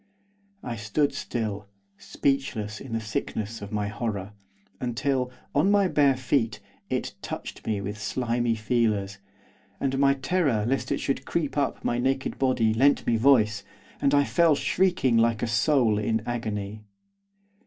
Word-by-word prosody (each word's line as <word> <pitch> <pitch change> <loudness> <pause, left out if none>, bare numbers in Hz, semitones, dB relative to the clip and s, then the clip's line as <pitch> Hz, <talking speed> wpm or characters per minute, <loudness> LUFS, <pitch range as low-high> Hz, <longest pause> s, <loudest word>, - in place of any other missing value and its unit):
I 120 -2 -4
stood 110 +8 0
still, 105 -4 -4 0.3
speechless 110 -1 -2
in 130 -4 -8
the 115 - 0
sickness 110 0 -4
of 100 - -7
my 105 -1 -1
horror. 105 -2 -4 0.5
Until, 125 +1 -1 0.2
on 155 +7 +3
my 200 -1 +4
bare 140 -6 +3
feet, 130 -2 0 0.3
it - - -2
touched - - -7
me 105 -2 0
with 105 +2 -5
slimy 120 +1 0
feelers, 105 -3 0 0.6
and 135 0 -1
my 140 0 +4
terror 135 - +1
lest 135 +2 -1
it - - +1
should 135 -1 -2
creep 155 -4 -2
up 140 -2 -1
my 120 - +1
naked 135 +1 -1
body 125 -4 +2
lent 135 +5 +3
me 115 - +2
voice, 110 -4 +4 0.4
and 140 0 +3
I 145 - +5
fell 165 +1 +3
shrieking 175 -8 +2
like 115 0 +2
a - - +1
soul 110 0 +2
in 110 +1 0
agony. 110 -3 -4
120 Hz, 150 wpm, -26 LUFS, 105-135 Hz, 0.6 s, I